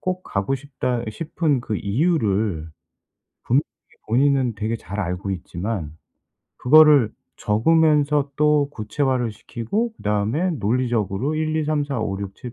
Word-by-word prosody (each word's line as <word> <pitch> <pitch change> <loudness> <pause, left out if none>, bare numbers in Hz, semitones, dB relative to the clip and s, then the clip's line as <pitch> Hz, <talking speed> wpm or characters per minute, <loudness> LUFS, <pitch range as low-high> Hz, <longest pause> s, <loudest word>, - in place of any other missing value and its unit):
꼭 185 0 -3
가고 100 +6 -2
싶다 130 -3 -3
이 - - -3
싶은 155 0 -1
그 110 -3 -3
이유를 105 - 0 0.8
분명히 - - +3 0.5
본인은 130 0 +2
되게 110 +2 -2
잘 100 -1 -8
알고 90 +1 -3
있지만 90 -2 -5 0.6
그거를 145 -4 +6 0.2
적으면서 150 +4 +2
또 150 -1 +3
구체화를 125 +1 -1
시키고 205 - -3
그 - - -16
다음에 105 - 0
논리적으로 120 - -1
1, 155 0 -1
2, 155 - 0
3, 150 -1 0
4, 135 -5 -3
5, 100 -3 -2
6, 100 -1 -6
7, 125 - -9
125 Hz, 240 characters per minute, -22 LUFS, 105-150 Hz, 0.8 s, 그거를